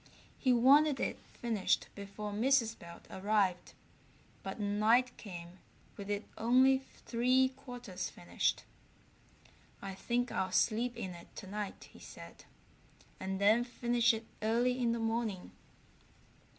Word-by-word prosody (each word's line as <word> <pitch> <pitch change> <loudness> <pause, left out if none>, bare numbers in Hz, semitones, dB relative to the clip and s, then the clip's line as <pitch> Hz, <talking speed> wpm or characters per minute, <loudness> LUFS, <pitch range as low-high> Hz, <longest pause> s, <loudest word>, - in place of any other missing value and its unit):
He 260 - +3
wanted 275 +4 +5
it - - -2
finished 225 -5 0
before 205 +1 -6
Mrs. 230 0 +2
Belt 170 -2 -12
arrived, 195 -2 0 0.7
but 195 +2 -6
night 215 +5 +3
came 175 -3 -9 0.4
with 200 0 -8
it 205 +1 -2
only 260 +3 +5 0.3
three 255 +2 +3
quarters 245 -8 -7
finished. 85 0 -1 1.2
"I 195 -1 -6
think 245 +5 -1
I'll 185 -1 -1
sleep 235 +5 +1
in 195 -5 -4
it 170 0 -12
tonight," 205 +1 -6
he - - -14
said, - - -12 0.7
"and 190 0 -3
then 215 +4 +5
finish 240 0 +2
it 225 0 -4 0.2
early 240 +3 +1
in 235 -1 +2
the 235 - 0
morning." 225 -4 -2
225 Hz, 125 wpm, -33 LUFS, 195-245 Hz, 1.2 s, wanted